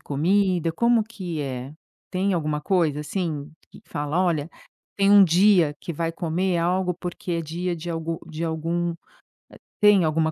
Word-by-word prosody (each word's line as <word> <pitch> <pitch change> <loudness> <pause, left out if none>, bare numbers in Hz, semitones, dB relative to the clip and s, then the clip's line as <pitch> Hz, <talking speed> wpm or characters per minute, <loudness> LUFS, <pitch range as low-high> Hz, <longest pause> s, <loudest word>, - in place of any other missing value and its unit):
comida? 175 +3 +1
Como 235 +5 +3
que 185 -8 -6
é? 130 -1 -5 0.4
Tem 190 +1 0
alguma 155 -3 -1
coisa 160 -4 +1
assim, 150 -2 -3 0.2
que - - -14
fala: 145 +4 -2
"Olha, 165 -4 0 0.5
tem 200 0 +3
um 205 -1 +8
dia 180 -3 +4
que 170 - -5
vai 165 +1 -2
comer 175 +2 -1
algo 180 +1 0
porque 175 +1 -6
é 170 0 -1
dia 175 +3 -3
de 170 +2 -6
algo 165 0 -3
de 160 +1 -4
algum". 165 +2 -1
Eh, - - -9 0.9
tem 210 -3 +6
alguma 160 0 +1
170 Hz, 165 wpm, -24 LUFS, 155-185 Hz, 0.9 s, um